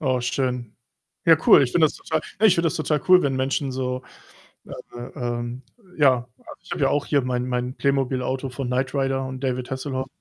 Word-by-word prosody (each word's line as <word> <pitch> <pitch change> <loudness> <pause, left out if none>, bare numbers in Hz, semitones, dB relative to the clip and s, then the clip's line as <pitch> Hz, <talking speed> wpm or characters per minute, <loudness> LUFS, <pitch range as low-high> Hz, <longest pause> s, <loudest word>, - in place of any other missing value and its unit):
Oh, 130 -3 +1
schön. 125 -2 -2 0.5
Ja, 165 -1 +8
cool, - - +8
ich 125 - -1
finde 160 -2 +5
das - - -5
total 160 -1 -2 0.2
ne, 220 - +7
ich 185 - +5
finde 170 -1 +1
das 165 - 0
total 155 -2 0
cool, 185 0 +7
wenn 140 -2 0
Menschen 135 +1 -1
so, 130 0 -3 0.6
äh - - -13 0.3
äh, 120 0 -7
ähm 120 +1 -3 0.4
ja, 130 -5 +3
also - - -13
ich - - -16
habe - - -3
ja - - +4
auch 145 - 0
hier 145 -2 +2
mein 125 0 -2
mein 125 0 -2
Playmobil-Auto 135 -1 -1
von 130 0 -5
Knight 130 +1 -1
Rider 135 -1 0
und 130 0 -7
David 130 -1 -2
Hasselhoff 130 0 -3
130 Hz, 210 wpm, -23 LUFS, 125-140 Hz, 0.6 s, Ja